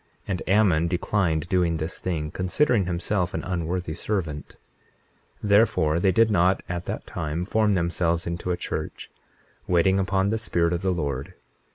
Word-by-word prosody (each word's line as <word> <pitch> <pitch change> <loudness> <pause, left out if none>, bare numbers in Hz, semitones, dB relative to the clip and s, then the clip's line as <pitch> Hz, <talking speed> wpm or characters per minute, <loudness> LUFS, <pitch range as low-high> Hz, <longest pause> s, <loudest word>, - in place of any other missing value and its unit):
And 95 -2 -2
Ammon 95 -5 +4
declined 85 -3 0
doing 90 -3 +1
this 80 +2 -4
thing, 80 -4 -3
considering 100 - +1
himself 90 +1 -1
an - - -3
unworthy 90 -1 -2
servant. 80 -5 -4 0.9
21:34 105 - -2
Therefore 90 -7 +4
they 95 +2 +3
did 110 +4 +3
not 95 -1 +3
at 85 0 -4
that - - -5
time 80 +3 -3
form 105 0 +2
themselves 85 0 0
into 85 +1 -4
a 90 - 0
church, - - -5 0.6
waiting 90 +2 +3
upon 95 +1 +1
the 110 - 0
Spirit 85 -6 0
of 85 - -2
the 95 - 0
Lord. 70 -6 -3
90 Hz, 160 wpm, -25 LUFS, 85-95 Hz, 0.9 s, Ammon